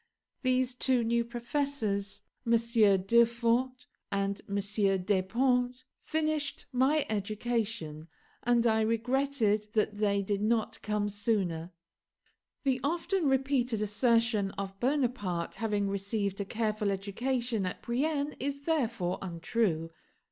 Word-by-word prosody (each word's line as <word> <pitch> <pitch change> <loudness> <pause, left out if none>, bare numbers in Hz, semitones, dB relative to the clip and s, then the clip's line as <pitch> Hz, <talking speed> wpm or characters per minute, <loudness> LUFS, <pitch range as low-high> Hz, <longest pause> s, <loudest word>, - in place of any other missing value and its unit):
These 255 -1 +2
two 250 -1 +1
new 235 +1 +2
professors, 235 -5 -2 0.2
MM. 225 -5 +4
Durfort 235 +3 +2 0.3
and 200 0 -1
Desponts, 210 +5 +1 0.2
finished 310 -2 -1
my 275 +4 +3
education; 210 -6 -2 0.3
and 240 0 +2
I 220 -1 +3
regretted 230 -1 +1
that 215 -2 0
they 200 -1 +2
did 200 0 -1
not 225 0 0
come 210 -1 -1
sooner. 195 -5 -1 0.9
The 265 -2 +1
often 340 +3 0
repeated 265 -4 +1
assertion 225 -1 +2
of 195 0 -5
Bonaparte 240 - 0
having 210 -3 -1
received 200 0 -2
a - - -3
careful 215 -1 -1
education 225 +2 -1
at - - -6
Brienne 285 +4 -1
is 280 +1 -3
therefore 235 - 0
untrue. 170 -1 -1
225 Hz, 105 wpm, -30 LUFS, 200-255 Hz, 0.9 s, MM